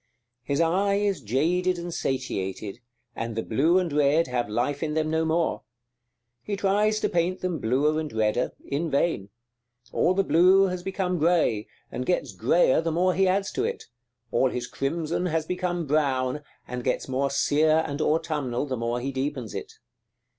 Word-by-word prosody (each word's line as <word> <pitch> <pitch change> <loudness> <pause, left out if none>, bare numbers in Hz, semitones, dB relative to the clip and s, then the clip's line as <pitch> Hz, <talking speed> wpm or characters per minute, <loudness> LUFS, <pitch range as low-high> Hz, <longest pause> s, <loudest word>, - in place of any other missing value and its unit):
His 140 +3 -2
eye 190 +5 +2
is 200 -5 0
jaded 175 - +1
and 170 0 -5
satiated, 110 -7 -3 0.4
and 115 -1 -4
the 115 - -2
blue 155 +10 +2
and 175 -5 0
red 150 +3 +3
have 120 -4 -1
life 125 +6 -1
in 155 -1 -2
them 155 0 0
no 160 0 +1
more. 160 +1 0 0.8
He 205 - -3
tries 205 +2 +2
to - - +2
paint 175 +2 0
them 180 -3 -2
bluer 145 +7 +1
and 155 -2 -4
redder, 110 +2 0
in 155 +4 -2
vain: 140 - 0 0.6
all 185 - +2
the 195 - +3
blue 185 +2 +5
has 180 -2 -1
become 185 -1 -2
grey, 155 -10 +2 0.2
and 125 - -3
gets 125 - -1
greyer 130 - +3
the 165 0 -1
more 180 +3 +2
he 190 +1 +2
adds 195 +1 +1
to 390 - -1
it; 470 +1 -3 0.5
all 130 - +3
his 125 -1 -3
crimson 160 +7 -2
has 160 -2 -1
become 180 -1 -2
brown, 140 -2 0 0.3
and 125 0 -5
gets 125 - -1
more 135 +1 0
sere 155 +3 +3
and 145 0 -4
autumnal 150 -5 0
the 130 -3 -3
more 115 +1 -1
he 135 +3 -3
deepens 130 -4 -3
it. - - -6
155 Hz, 175 wpm, -26 LUFS, 130-180 Hz, 0.8 s, blue